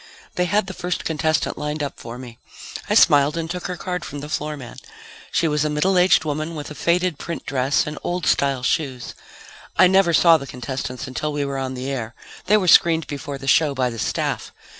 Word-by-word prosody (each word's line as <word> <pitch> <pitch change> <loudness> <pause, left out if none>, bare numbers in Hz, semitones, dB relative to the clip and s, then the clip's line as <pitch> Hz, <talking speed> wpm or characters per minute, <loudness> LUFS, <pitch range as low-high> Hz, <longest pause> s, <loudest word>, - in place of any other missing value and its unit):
They 180 - 0
had 205 +2 +1
the 190 - -7
first 180 -1 -4
contestant 155 -1 0
lined 150 0 -3
up 140 - -5
for 115 +1 -8
me. 125 -2 -11 0.5
I - - +2
smiled 145 +2 +5
and 165 -1 -2
took 180 +1 -4
her 180 - -5
card 180 +1 -4
from 145 - -7
the 150 - -8
floor 150 0 -3
man. 125 -4 -10 0.5
She 165 - +1
was 150 -1 +1
a 155 - 0
middle 150 +6 +1
aged 180 -2 +4
woman 155 +2 -3
with 150 0 -6
a - - -5
faded 175 0 0
print 170 0 -6
dress 135 +1 +1
and 150 - -6
old 175 -1 -2
style 135 -3 +1
shoes. 130 -1 -1 0.6
I - - +7
never 190 -1 +4
saw 165 0 +6
the 140 -2 -8
contestants 125 +1 -5
until 140 +4 -3
we 145 -1 -2
were 140 -1 -3
on 130 -1 -3
the 130 +2 -4
air. 120 -3 -4 0.3
They 210 +2 +5
were 190 -3 -1
screened 165 -1 +5
before 140 -1 -6
the 135 - -10
show 145 +1 +3
by 130 -2 0
the 115 - -7
staff. - - -2
150 Hz, 220 wpm, -22 LUFS, 135-170 Hz, 0.6 s, I